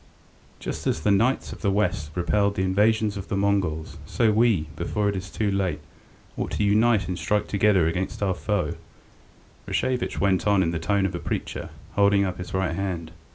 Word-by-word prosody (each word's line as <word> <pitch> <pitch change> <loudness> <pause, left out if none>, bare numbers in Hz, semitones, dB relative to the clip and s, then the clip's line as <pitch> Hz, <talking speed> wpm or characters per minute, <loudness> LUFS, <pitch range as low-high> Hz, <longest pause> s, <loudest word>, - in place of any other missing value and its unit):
"Just - - -4
as - - 0
the 105 - +2
knights 115 +7 +2
of - - -12
the 100 - +1
west 100 -7 0
repelled 100 +4 +1
the 95 - 0
invasions 105 +2 +2
of 100 - -6
the 100 - -2
Mongols, 95 -6 0
so 115 -2 +2
we, 110 -4 +3
before 105 +5 -1
it 100 - -2
is 95 0 -5
too 105 -2 -1
late, 95 -4 0 0.6
ought - - -3
to - - 0
unite 105 +1 +3
and 90 -1 -3
strike 105 0 0
together 100 -4 +3
against 90 +5 -2
our 95 -2 +2
foe," 100 +1 -1 0.9
Rashevitch 125 -1 -1
went 95 0 +2
on 100 -2 +4
in 80 - 0
the 85 - -2
tone 100 +4 +1
of 95 - -1
a 85 - -3
preacher, - - -4 0.2
holding 100 -1 +3
up 90 -1 -4
his 90 - -6
right 95 -3 0
hand. 85 -4 -3
100 Hz, 195 wpm, -25 LUFS, 90-105 Hz, 0.9 s, on